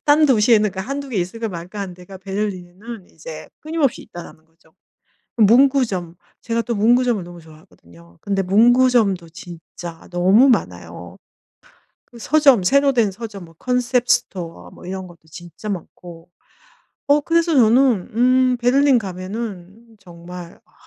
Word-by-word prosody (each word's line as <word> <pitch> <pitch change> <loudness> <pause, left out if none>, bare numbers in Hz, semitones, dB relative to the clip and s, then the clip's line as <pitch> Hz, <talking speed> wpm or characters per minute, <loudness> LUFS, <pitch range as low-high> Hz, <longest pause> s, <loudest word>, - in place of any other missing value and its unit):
"딴 300 +1 +4
도시에는 215 -4 +3
그 190 - -5
1-2 275 +6 -5
개 235 - -5
있을까 220 +6 -3
말까 180 +3 -8
하는 185 -3 -6
데가 180 +1 -13
베를린에는 195 +1 -6
이제 - - -10
끊임없이 310 -4 -1
있다."라는 170 -2 -12
거죠. 160 0 -31 0.6
문구점. 225 -6 +3 0.2
제가 230 0 -2
또 235 -1 -3
문구점을 235 0 +2
너무 175 0 -12
좋아하거든요. 85 - -19
근데 195 -1 -1
문구점도 220 -3 +3
진짜 170 0 -11
너무 190 +9 +4
많아요. 90 - -2 0.9
그 240 - -17
서점 275 -5 +4
새로 280 +7 +3
된 220 -5 +2
서점 205 -3 -9
뭐 165 -1 -19
concept 250 0 0
store 170 -3 -2
뭐 - - -14
이런 190 0 -6
것도 175 -1 -16
진짜 175 +5 -10
많고. 175 -2 -8 0.8
어 290 +1 +4
그래서 335 +1 +1
저는 240 -4 +3
음 255 +1 +3
베를린 260 +2 +3
가면은 200 +2 -7
정말 175 -1 -12
아 - - -33
205 Hz, 315 characters per minute, -20 LUFS, 175-245 Hz, 0.9 s, 딴